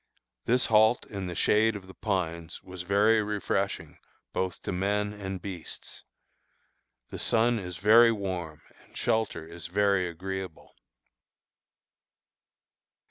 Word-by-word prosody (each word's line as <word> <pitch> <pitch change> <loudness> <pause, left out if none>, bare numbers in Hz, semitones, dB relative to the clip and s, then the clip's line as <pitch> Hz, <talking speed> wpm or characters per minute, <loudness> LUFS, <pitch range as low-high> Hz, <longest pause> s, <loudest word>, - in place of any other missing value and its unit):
This 125 +2 +3
halt 110 +2 +4
in 100 -3 -5
the 90 - -5
shade 110 +4 +3
of 100 -2 -8
the 95 - -12
pines 85 -4 -3
was 90 -1 -8
very 105 +4 +3
refreshing 105 -1 -2 0.3
both 95 -1 -2
to - - -3
men 105 +3 0
and 95 -2 -5
beasts. 90 -5 -8 1.1
The - - -6
sun 115 +1 +3
is 90 -3 -6
very 115 +4 +7
warm 90 -7 -4 0.2
and - - -15
shelter 110 -8 -1
is 85 0 -8
very 100 -1 +2
agreeable. 95 0 -7
95 Hz, 120 wpm, -28 LUFS, 90-105 Hz, 1.1 s, very